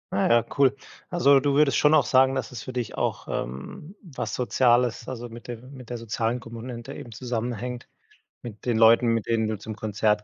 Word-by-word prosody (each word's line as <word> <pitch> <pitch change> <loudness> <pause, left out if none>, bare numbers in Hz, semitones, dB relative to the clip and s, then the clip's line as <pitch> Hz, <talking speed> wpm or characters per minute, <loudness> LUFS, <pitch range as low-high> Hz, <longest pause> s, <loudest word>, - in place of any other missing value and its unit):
Ah 100 - +2
ja, 115 0 +5 0.2
cool. 135 -1 +5 0.3
Also, 140 -6 +5
du 140 0 +1
würdest 145 -1 +4
schon 150 +1 +5
auch 145 -5 +4
sagen, 130 +1 +4
dass 130 -4 -3
es 120 -3 -7
für 130 - -7
dich 125 -3 -4
auch, - - -2
ähm, 70 - -6
was 125 - -5
Soziales, 120 -1 +2
also, 120 -2 -6
mit 115 0 -11
dem 120 +3 -8
mit 125 -3 -11
der 120 - -4
sozialen 115 +1 -2
Kommune 120 0 -8
eben 120 - -9
zusammenhängt 120 +1 -4 0.5
mit 110 -3 -10
den 120 -2 +1
Leuten, 115 +2 +6
mit 115 -2 0
denen 115 -1 +1
du 110 -2 -3
zum 110 +1 -7
Konzert 105 0 0
120 Hz, 200 wpm, -25 LUFS, 115-130 Hz, 0.5 s, Leuten